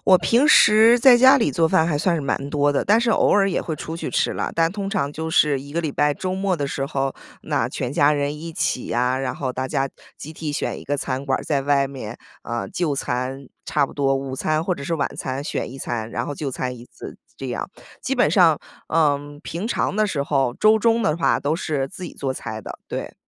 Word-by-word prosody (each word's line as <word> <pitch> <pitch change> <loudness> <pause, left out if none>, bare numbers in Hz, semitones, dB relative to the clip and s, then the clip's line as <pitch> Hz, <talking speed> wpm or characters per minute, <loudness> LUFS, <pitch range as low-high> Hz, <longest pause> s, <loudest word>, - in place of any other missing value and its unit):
我 185 -1 +6
平 245 +10 +3
时 225 -2 +6
在 245 0 +7
家 260 +3 +7
里 225 - +1
做 165 -3 +2
饭 160 -1 +3
还 155 -3 0
算 170 +3 +1
是 160 - -1
蛮 140 0 -2
多 145 -1 +2
的， - - 0
但 215 +4 +4
是 235 - +1
偶 - - +3
尔 200 -1 +4
也 - - 0
会 160 - -4
出 160 +2 -6
去 - - -5
吃 - - +1
啦。 - - -2
但 165 0 +2
通 195 0 -4
常 185 -9 -1
就 160 +1 -4
是 150 -3 +3
一 140 +2 -11
个 170 - 0
礼 160 -3 -2
拜 145 +1 +1
周 185 +5 -3
末 190 -1 0
的 145 -3 -2
时 135 0 -3
候， 135 -2 -2 0.3
那 - - -1
全 125 - -4
家 145 +1 +4
人 145 0 -1
一 165 +1 -7
起 130 - -1
呀， 125 +2 0
然 135 -1 -2
后 130 -3 -3
大 130 +1 -3
家 135 +1 -1 0.3
集 155 - -8
体 155 -1 -5
选 - - -3
一 - - -11
个 145 - -1
餐 135 0 -3
馆 135 -2 0
儿 - - -6
在 140 -3 -1
外 140 -1 +2
面， 125 -4 -7 0.3
呃， 120 0 -4
就 175 -6 -1
餐。 130 0 -3 0.2
差 145 -2 +1
不 - - -12
多 135 -1 +1
午 135 -1 -4
餐 155 +3 -1
或 180 - 0
者 - - -9
是 165 +4 -2
晚 145 - 0
餐 135 +2 -4
选 - - -3
一 135 - -9
餐， 115 -3 -4
然 - - -3
后 145 - -4
就 140 -1 -4
餐 125 0 -4
一 120 - -12
次， - - -11 0.2
这 135 - -6
样。 125 +8 -4 0.3
基 270 0 -1
本 245 - +4
上， 170 -7 +4 0.3
嗯， 145 -2 +1
平 170 +5 -5
常 225 - -1
的 215 - +2
时 140 -6 -2
候 135 -4 +1
周 215 +1 +5
中 230 +1 +2
的 155 -3 +1
话 170 - +2
都 145 +2 -1
是 150 -5 -2
自 185 +4 -11
己 175 - -6
做 135 -2 -3
菜 110 -4 -6
的， - - -9
对。 - - -5
145 Hz, 270 characters per minute, -22 LUFS, 135-175 Hz, 0.3 s, 在